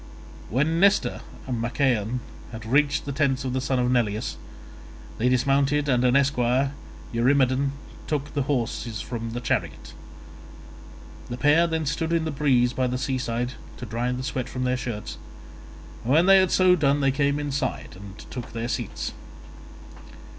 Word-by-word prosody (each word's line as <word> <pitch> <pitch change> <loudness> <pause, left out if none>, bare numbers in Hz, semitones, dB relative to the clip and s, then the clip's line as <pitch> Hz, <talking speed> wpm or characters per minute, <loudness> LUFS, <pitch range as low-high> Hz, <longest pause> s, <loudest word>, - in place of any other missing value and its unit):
When 150 +7 +1
Nestor 200 +2 +3 0.2
and 125 -3 -3
Machaon 120 -1 0 0.3
had 110 -1 -8
reached 145 +4 +2
the 140 - -3
tents 135 -2 0
of 130 - -2
the 130 - 0
son 130 0 0
of 125 0 +1
Neleus, 110 -4 0 0.8
they 125 +3 +3
dismounted, 140 +3 +2
and 125 -3 +2
an 125 0 +3
esquire, 135 0 +2 0.4
Eurymedon, 130 +2 +2 0.3
took 145 -2 -2
the 145 - 0
horses 120 -4 -2
from 115 -1 -5
the 120 - -3
chariot. 120 - -3 1.4
The 120 - -4
pair 150 +6 +4
then 160 -1 -1
stood 160 +3 -1
in 165 -1 +1
the 160 - -2
breeze 130 -4 +2
by 130 0 0
the 125 +1 -2
seaside 125 -2 -2 0.3
to 125 - -7
dry 120 +2 -2
the 125 +1 -3
sweat 130 -2 -3
from 130 - -4
their 125 0 +1
shirts, 120 -5 -5 0.8
and 120 - -1
when 160 +5 +5
they 195 0 +7
had 185 -1 +3
so 185 -1 +5
done 145 -3 +2
they 135 -1 +3
came 140 +1 +1
inside 145 - -3
and 100 +1 -11
took 125 -2 -7
their 115 0 -3
seats. 120 -5 -3
130 Hz, 160 wpm, -25 LUFS, 120-145 Hz, 1.4 s, they